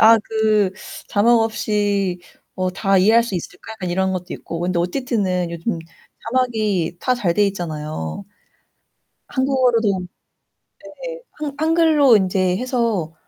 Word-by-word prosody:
'아 225 Hz, +1 st, +8 dB
그 215 Hz, -3 st, +2 dB, 0.4 s
자막 230 Hz, +3 st, +4 dB
없이 205 Hz, -4 st, 0 dB, 0.4 s
어 185 Hz, -1 st, -1 dB
다 195 Hz, +1 st, +1 dB
이해할 220 Hz, +5 st, +5 dB
수 230 Hz, -5 st, -5 dB
있을까?' 200 Hz, +5 st, -6 dB
약간 185 Hz, -5 st, -5 dB
이런 190 Hz, +1 st, 0 dB
것도 180 Hz, -1 st, -4 dB
있고 165 Hz, 0 st, -6 dB
근데 175 Hz, 0 st, 0 dB
OTT는 185 Hz, -3 st, -1 dB
요즘 170 Hz, +2 st, -3 dB, 0.5 s
자막이 215 Hz, -9 st, 0 dB
다 255 Hz, -, +1 dB
잘 185 Hz, -8 st, 0 dB
돼 205 Hz, -1 st, +3 dB
있잖아요. 155 Hz, -, -5 dB, 1.0 s
한국어로도 250 Hz, -7 st, +2 dB, 0.8 s
네. -, -, -8 dB, 0.2 s
한 285 Hz, -2 st, -3 dB
한글로 315 Hz, -5 st, +4 dB
인제 185 Hz, -1 st, +1 dB
해서 230 Hz, -10 st, -1 dB
205 Hz, 250 characters per minute, -20 LUFS, 180-235 Hz, 1.0 s, 아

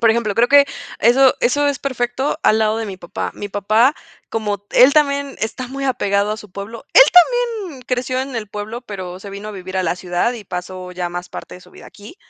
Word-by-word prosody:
Por 225 Hz, -1 st, +5 dB
ejemplo, 220 Hz, -3 st, 0 dB
creo 235 Hz, +1 st, +3 dB
que 285 Hz, 0 st, +7 dB, 0.3 s
eso 255 Hz, +3 st, +5 dB
eso 290 Hz, +4 st, +2 dB
es 285 Hz, -, -1 dB
perfecto 260 Hz, +2 st, -2 dB
al 220 Hz, -, +4 dB
lado 215 Hz, 0 st, +1 dB
de 225 Hz, -, -3 dB
mi 190 Hz, -2 st, -6 dB
papá. 175 Hz, -1 st, -5 dB
Mi 205 Hz, -, -6 dB
papá, 215 Hz, +7 st, +2 dB, 0.3 s
como 205 Hz, -2 st, -3 dB
él 255 Hz, +3 st, +6 dB
también 280 Hz, -2 st, +1 dB
está 235 Hz, +3 st, -3 dB
muy 275 Hz, +1 st, -5 dB
apegado 205 Hz, -5 st, +1 dB
a -, -, -4 dB
su 210 Hz, -3 st, -12 dB
pueblo, 200 Hz, +5 st, -8 dB
él -, -, +11 dB
también 410 Hz, -, +3 dB
creció 255 Hz, 0 st, -1 dB
en 265 Hz, -1 st, -5 dB
el 215 Hz, -2 st, -4 dB
pueblo, 210 Hz, +3 st, -6 dB
pero 185 Hz, -4 st, -7 dB
se 200 Hz, -, -9 dB
vino 200 Hz, +2 st, -7 dB
a -, -, -6 dB
vivir 190 Hz, -1 st, -7 dB
a 185 Hz, -, 0 dB
la 170 Hz, -, 0 dB
ciudad 180 Hz, +6 st, -1 dB
y 235 Hz, -, -8 dB
pasó 180 Hz, 0 st, -6 dB
ya 180 Hz, -1 st, -3 dB
más 175 Hz, +1 st, -6 dB
parte -, -, -9 dB
de 180 Hz, -, -15 dB
su -, -, -18 dB
vida -, -, -14 dB
aquí, 210 Hz, -, -14 dB
220 Hz, 230 wpm, -19 LUFS, 200-265 Hz, 0.3 s, él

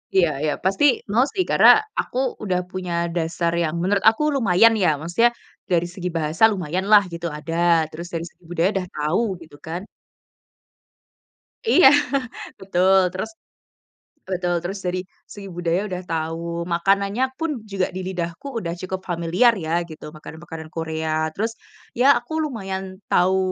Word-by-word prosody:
Iya 175 Hz, -4 st, +5 dB
iya 150 Hz, -, +1 dB
pasti 195 Hz, +8 st, +1 dB, 0.3 s
mau 245 Hz, +3 st, +4 dB
sih, 370 Hz, -, +1 dB
karena -, -, +7 dB, 0.3 s
aku 250 Hz, -, -8 dB, 0.3 s
udah 180 Hz, -3 st, 0 dB
punya 180 Hz, -2 st, -4 dB, 0.2 s
dasar 170 Hz, 0 st, 0 dB
yang 160 Hz, -1 st, -1 dB
menurut 200 Hz, +2 st, +1 dB
aku 225 Hz, +7 st, -2 dB
lumayan 225 Hz, -1 st, +5 dB
ya, 175 Hz, -, +5 dB
maksudnya 175 Hz, +9 st, +2 dB, 0.4 s
dari 175 Hz, 0 st, +3 dB
segi 180 Hz, -1 st, -4 dB
bahasa 155 Hz, +5 st, -1 dB
lumayan 185 Hz, 0 st, -2 dB
lah 205 Hz, -1 st, +8 dB
gitu, 170 Hz, 0 st, -4 dB
ada. 165 Hz, +2 st, -6 dB, 0.4 s
Terus 170 Hz, +2 st, -7 dB
dari 165 Hz, 0 st, -3 dB
segi 175 Hz, -, -36 dB
budaya 175 Hz, +2 st, +1 dB
udah 185 Hz, -2 st, -2 dB
tau, 150 Hz, +8 st, 0 dB, 0.2 s
gitu 155 Hz, -2 st, -14 dB
kan. 170 Hz, +3 st, -4 dB, 1.9 s
Iya, 360 Hz, -, +7 dB, 0.7 s
betul 190 Hz, 0 st, +3 dB, 0.2 s
terus 190 Hz, +4 st, -4 dB, 1.0 s
betul 180 Hz, -2 st, -1 dB
terus 195 Hz, +3 st, -4 dB
dari 180 Hz, +1 st, -1 dB, 0.3 s
segi 200 Hz, -1 st, -9 dB
budaya 175 Hz, +1 st, 0 dB
udah 180 Hz, 0 st, -4 dB
tau, 165 Hz, 0 st, -2 dB, 0.3 s
makanannya 200 Hz, +6 st, +1 dB, 0.2 s
pun 330 Hz, 0 st, -1 dB, 0.2 s
juga 190 Hz, -2 st, 0 dB
di -, -, -3 dB
lidahku 175 Hz, +5 st, -5 dB
udah 170 Hz, -3 st, -4 dB
cukup 185 Hz, 0 st, -4 dB
familiar 175 Hz, +8 st, +3 dB
ya 160 Hz, -, -4 dB, 0.2 s
gitu, 155 Hz, -, -11 dB
makanan 155 Hz, +1 st, -10 dB
makanan 160 Hz, -2 st, -8 dB
Korea 160 Hz, -1 st, -3 dB, 0.2 s
terus, 225 Hz, +6 st, -2 dB, 0.4 s
ya 245 Hz, +3 st, +2 dB
aku 240 Hz, +6 st, -12 dB
lumayan 195 Hz, -9 st, -4 dB, 0.3 s
tau 185 Hz, +2 st, +3 dB
180 Hz, 150 wpm, -22 LUFS, 165-195 Hz, 1.9 s, lah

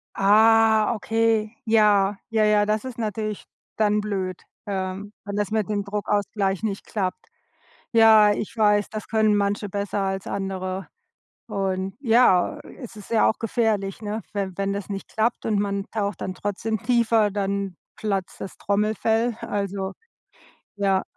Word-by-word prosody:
Ah, 220 Hz, +2 st, +5 dB
okay, 225 Hz, 0 st, 0 dB
ja, 210 Hz, -3 st, +4 dB
ja, 220 Hz, -1 st, +2 dB
ja, 210 Hz, -1 st, +3 dB
das 215 Hz, +3 st, 0 dB
ist 255 Hz, -1 st, -7 dB
natürlich 215 Hz, -1 st, -3 dB, 0.3 s
dann 210 Hz, -1 st, +2 dB
blöd, 190 Hz, -3 st, -3 dB, 0.3 s
ähm, 190 Hz, +1 st, -4 dB
wenn 200 Hz, 0 st, -4 dB
das 205 Hz, 0 st, -1 dB
mit 215 Hz, -2 st, 0 dB
dem 205 Hz, -1 st, -1 dB
Druckausgleich 200 Hz, -1 st, -1 dB
nicht 205 Hz, -3 st, -3 dB
klappt. 200 Hz, -, -3 dB, 0.7 s
Ja, 220 Hz, -2 st, +7 dB
ich 210 Hz, +2 st, -4 dB
weiß, 210 Hz, -2 st, +3 dB
das 215 Hz, 0 st, -7 dB
können 220 Hz, -1 st, +3 dB
manche 205 Hz, +1 st, 0 dB
besser 200 Hz, +1 st, -3 dB
als 195 Hz, 0 st, -2 dB
andere. 190 Hz, -1 st, -3 dB, 0.6 s
Und 195 Hz, -2 st, -2 dB
ja, 240 Hz, -, +4 dB, 0.2 s
es 235 Hz, -2 st, -9 dB
ist 210 Hz, -, -12 dB
ja 225 Hz, -2 st, +4 dB
auch -, -, -1 dB
gefährlich, 215 Hz, -3 st, -1 dB
ne, 210 Hz, +1 st, -3 dB
we 200 Hz, -2 st, -2 dB
wenn 195 Hz, 0 st, -1 dB
das 200 Hz, -1 st, -5 dB
nicht 195 Hz, -1 st, -5 dB
klappt 225 Hz, +2 st, -1 dB
und 210 Hz, -2 st, +1 dB
man 200 Hz, -1 st, -1 dB
taucht 205 Hz, -4 st, -2 dB
dann 185 Hz, -, -3 dB
trotzdem 205 Hz, +2 st, -3 dB
tiefer, 230 Hz, -3 st, +3 dB
dann 200 Hz, -2 st, -2 dB, 0.2 s
platzt 195 Hz, -3 st, -3 dB
das 195 Hz, -, -7 dB
Trommelfell, 220 Hz, +3 st, +1 dB
also 200 Hz, -1 st, -2 dB, 0.8 s
ja. 195 Hz, -1 st, +2 dB
205 Hz, 145 wpm, -24 LUFS, 195-220 Hz, 0.8 s, Ja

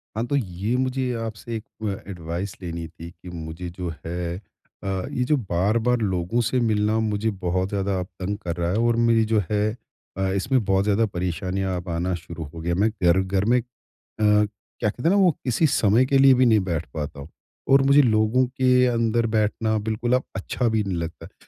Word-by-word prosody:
हाँ, 115 Hz, -, -1 dB
तो 145 Hz, -, 0 dB
ये 105 Hz, -1 st, -1 dB
मुझे 130 Hz, 0 st, 0 dB
आपसे 115 Hz, +1 st, -6 dB
एक 110 Hz, -, -5 dB, 0.2 s
अ, 100 Hz, -1 st, -4 dB
एडवाइस 85 Hz, +2 st, -5 dB
लेनी 85 Hz, -1 st, -5 dB
थी 85 Hz, +1 st, -10 dB
कि 90 Hz, +2 st, -13 dB
मुझे 85 Hz, +1 st, -6 dB
जो 90 Hz, 0 st, -5 dB, 0.2 s
है 85 Hz, 0 st, -3 dB, 0.5 s
अ, -, -, -4 dB, 0.2 s
ये 125 Hz, -, 0 dB
जो 150 Hz, +4 st, +2 dB
बार-बार 110 Hz, +4 st, +1 dB
लोगों 95 Hz, +2 st, 0 dB
से 130 Hz, -, +2 dB
मिलना 105 Hz, +1 st, +1 dB
मुझे 110 Hz, 0 st, 0 dB, 0.2 s
बहुत 90 Hz, +2 st, 0 dB
ज़्यादा 100 Hz, -1 st, -1 dB
अब 90 Hz, -, -3 dB
तंग 100 Hz, +2 st, -2 dB
कर 85 Hz, -5 st, -4 dB
रहा 85 Hz, 0 st, -1 dB
है 100 Hz, -, 0 dB
और 120 Hz, -, +3 dB
मेरी 115 Hz, -1 st, +4 dB
जो 110 Hz, -, +5 dB
है 105 Hz, 0 st, +2 dB, 0.5 s
अ, 95 Hz, 0 st, 0 dB
इसमें 120 Hz, +5 st, +1 dB
बहुत 95 Hz, 0 st, +2 dB
ज़्यादा 105 Hz, +2 st, +2 dB
परेशानियाँ 95 Hz, 0 st, -2 dB
अब 90 Hz, -, -10 dB
आना 85 Hz, +2 st, -1 dB
शुरू 85 Hz, -1 st, -7 dB
हो 85 Hz, -, -8 dB
गया 85 Hz, +1 st, -1 dB
है। 85 Hz, -, -1 dB
मैं 110 Hz, +2 st, +4 dB
घर 85 Hz, +2 st, +5 dB
घर 95 Hz, +1 st, 0 dB
में -, -, +5 dB
अ, -, -, -6 dB, 0.6 s
क्या 105 Hz, 0 st, +1 dB
कहते 120 Hz, +4 st, -7 dB
हैं -, -, +4 dB
ना 195 Hz, -, +3 dB
वो 185 Hz, -2 st, +5 dB
किसी 130 Hz, +6 st, +2 dB
समय 115 Hz, -2 st, +3 dB
के 135 Hz, +1 st, +2 dB
लिए 135 Hz, 0 st, +7 dB
भी 130 Hz, 0 st, +4 dB
नहीं 110 Hz, -2 st, +5 dB
बैठ 85 Hz, -1 st, -1 dB
पाता 75 Hz, -2 st, -5 dB
हूँ। 70 Hz, +3 st, -9 dB, 0.4 s
और 135 Hz, 0 st, +6 dB
मुझे 140 Hz, +2 st, +6 dB
लोगों 110 Hz, +1 st, +3 dB
के 125 Hz, -1 st, +4 dB
अंदर 115 Hz, -1 st, +1 dB
बैठना 110 Hz, 0 st, +1 dB
बिल्कुल 115 Hz, +3 st, 0 dB
अब 130 Hz, -, +2 dB
अच्छा 120 Hz, +5 st, -1 dB
भी 110 Hz, -1 st, +1 dB
नहीं 95 Hz, -3 st, -3 dB
लगता 85 Hz, 0 st, -5 dB
है। -, -, -19 dB
105 Hz, 210 wpm, -24 LUFS, 90-115 Hz, 0.6 s, लिए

